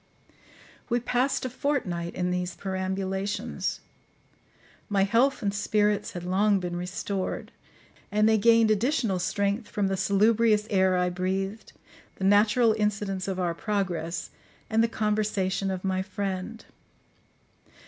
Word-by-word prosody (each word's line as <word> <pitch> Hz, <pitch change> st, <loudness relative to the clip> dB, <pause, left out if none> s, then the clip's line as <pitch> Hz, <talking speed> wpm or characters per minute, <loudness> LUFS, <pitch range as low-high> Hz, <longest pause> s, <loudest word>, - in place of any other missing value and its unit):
We 240 Hz, 0 st, +2 dB
passed 250 Hz, +3 st, 0 dB
a -, -, -1 dB
fortnight 200 Hz, -, -2 dB
in 180 Hz, 0 st, -1 dB
these 180 Hz, 0 st, -2 dB
perambulations: 190 Hz, +1 st, -3 dB, 1.1 s
my 200 Hz, -2 st, +3 dB
health 235 Hz, +6 st, +2 dB
and 200 Hz, -1 st, 0 dB
spirits 210 Hz, 0 st, +1 dB
had 175 Hz, -, -6 dB
long 195 Hz, +3 st, +2 dB
been 175 Hz, -1 st, -4 dB
restored, 185 Hz, +2 st, -4 dB, 0.6 s
and 210 Hz, +1 st, +3 dB
they 220 Hz, -1 st, +4 dB
gained 230 Hz, 0 st, +5 dB
additional 220 Hz, -3 st, +1 dB
strength 200 Hz, +4 st, -1 dB
from 200 Hz, -2 st, -1 dB
the 195 Hz, -, 0 dB
salubrious 210 Hz, +2 st, +3 dB
air 190 Hz, -2 st, +3 dB
I 180 Hz, 0 st, +1 dB
breathed, 190 Hz, +3 st, -3 dB, 0.4 s
the -, -, -7 dB
natural 210 Hz, +4 st, +4 dB
incidents 200 Hz, -2 st, -1 dB
of 190 Hz, -1 st, -2 dB
our 175 Hz, -2 st, 0 dB
progress, 175 Hz, -4 st, -2 dB, 0.4 s
and 225 Hz, +1 st, +4 dB
the -, -, +3 dB
conversation 210 Hz, -3 st, 0 dB
of 185 Hz, -1 st, -3 dB
my 190 Hz, -1 st, 0 dB
friend. 195 Hz, +3 st, -4 dB
200 Hz, 130 wpm, -27 LUFS, 185-215 Hz, 1.1 s, gained